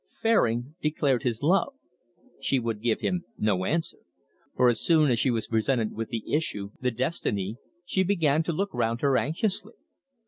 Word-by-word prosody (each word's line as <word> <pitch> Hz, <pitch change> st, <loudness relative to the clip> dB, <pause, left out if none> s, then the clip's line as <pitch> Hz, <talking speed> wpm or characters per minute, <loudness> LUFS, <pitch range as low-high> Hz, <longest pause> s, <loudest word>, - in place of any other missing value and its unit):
Fairing 130 Hz, -, +2 dB
declared 145 Hz, -4 st, +1 dB
his 120 Hz, -1 st, -2 dB
love. 195 Hz, -, +2 dB, 0.6 s
She 135 Hz, -, +1 dB
would 115 Hz, -4 st, -2 dB
give 115 Hz, -1 st, 0 dB
him 180 Hz, -1 st, -1 dB
no 95 Hz, -4 st, +1 dB
answer. 165 Hz, -, -1 dB, 0.6 s
For 125 Hz, -, +4 dB
as 120 Hz, -2 st, +2 dB
soon 155 Hz, -5 st, +4 dB
as 115 Hz, -, +2 dB
she 130 Hz, -, +2 dB
was 115 Hz, -3 st, 0 dB
presented 115 Hz, 0 st, 0 dB
with 115 Hz, 0 st, -4 dB
the 115 Hz, -3 st, -5 dB
issue, 105 Hz, -10 st, -1 dB
the 125 Hz, -, +2 dB
destiny, 115 Hz, -, -2 dB, 0.3 s
she 190 Hz, -, +1 dB
began 165 Hz, -6 st, +2 dB
to 170 Hz, -, 0 dB
look 195 Hz, +5 st, -2 dB
round 115 Hz, -1 st, -1 dB
her 140 Hz, -2 st, +3 dB
anxiously. 190 Hz, -, -1 dB
130 Hz, 170 wpm, -27 LUFS, 115-165 Hz, 0.6 s, For